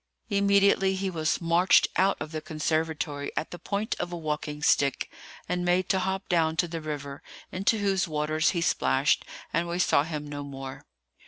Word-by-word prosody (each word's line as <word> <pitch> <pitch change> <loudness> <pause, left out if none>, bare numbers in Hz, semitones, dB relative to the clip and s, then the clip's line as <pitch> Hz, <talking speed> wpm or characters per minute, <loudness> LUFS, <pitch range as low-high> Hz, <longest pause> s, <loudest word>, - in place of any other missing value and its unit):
Immediately 200 -1 +3
he 190 0 -2
was 160 -3 0
marched 170 +2 +4
out 195 +1 +3
of 155 - -6
the 155 -1 -4
conservatory 155 -2 -2
at 155 - -2
the 175 - -7
point 205 +5 -2
of 175 - -3
a 175 - -4
walking 150 -2 -4
stick, 140 -2 +2 0.4
and 180 0 -1
made 180 +1 +1
to 190 - +3
hop 190 +1 -2
down 160 -2 +2
to 175 - +1
the 165 -1 -5
river, 145 -2 -5 0.3
into 195 +4 +1
whose 195 -3 +1
waters 155 0 +1
he 170 - -1
splashed, 65 - +2 0.3
and 170 +1 +1
we 170 +1 -2
saw 180 - +4
him 150 -1 -4
no 145 -1 -6
more. 135 -1 -8
165 Hz, 180 wpm, -27 LUFS, 150-185 Hz, 0.4 s, marched